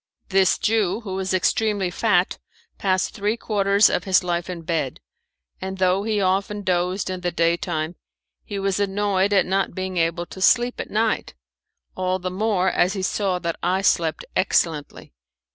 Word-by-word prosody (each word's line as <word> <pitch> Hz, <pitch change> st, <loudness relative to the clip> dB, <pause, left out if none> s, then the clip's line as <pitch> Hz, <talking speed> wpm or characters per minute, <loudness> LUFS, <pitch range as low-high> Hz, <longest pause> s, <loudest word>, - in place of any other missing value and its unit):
This 190 Hz, -1 st, +3 dB
Jew, 215 Hz, -1 st, +1 dB
who 200 Hz, -4 st, -6 dB
was 190 Hz, 0 st, -2 dB
extremely 195 Hz, +1 st, +1 dB
fat, 185 Hz, -2 st, +1 dB, 0.4 s
passed 185 Hz, -1 st, 0 dB
three 210 Hz, +3 st, -1 dB
quarters 200 Hz, -2 st, +3 dB
of -, -, -1 dB
his 190 Hz, -2 st, +3 dB
life 175 Hz, 0 st, -2 dB
in 175 Hz, -2 st, -6 dB
bed; 160 Hz, -6 st, -2 dB, 0.6 s
and 190 Hz, 0 st, -4 dB
though 185 Hz, +1 st, +2 dB
he 215 Hz, 0 st, -1 dB
often 195 Hz, +2 st, 0 dB
dozed 180 Hz, +1 st, 0 dB
in 185 Hz, -1 st, -5 dB
the 180 Hz, -, 0 dB
daytime, 165 Hz, -1 st, 0 dB, 0.5 s
he 205 Hz, -, -6 dB
was 195 Hz, 0 st, -1 dB
annoyed 200 Hz, 0 st, +1 dB
at 200 Hz, -2 st, +4 dB
not 190 Hz, -1 st, -1 dB
being 185 Hz, -1 st, -4 dB
able 170 Hz, +1 st, 0 dB
to 190 Hz, -, -11 dB
sleep 240 Hz, +6 st, +3 dB
at -, -, -8 dB
night 220 Hz, +1 st, -1 dB, 0.6 s
all 185 Hz, 0 st, 0 dB
the 185 Hz, 0 st, -4 dB
more 190 Hz, -1 st, +1 dB
as 180 Hz, +2 st, +2 dB
he 195 Hz, -2 st, -4 dB
saw 190 Hz, -1 st, 0 dB
that 170 Hz, -2 st, -4 dB
I 185 Hz, +2 st, 0 dB
slept 165 Hz, -4 st, +1 dB
excellently. 150 Hz, -, 0 dB
190 Hz, 165 wpm, -23 LUFS, 180-200 Hz, 0.6 s, at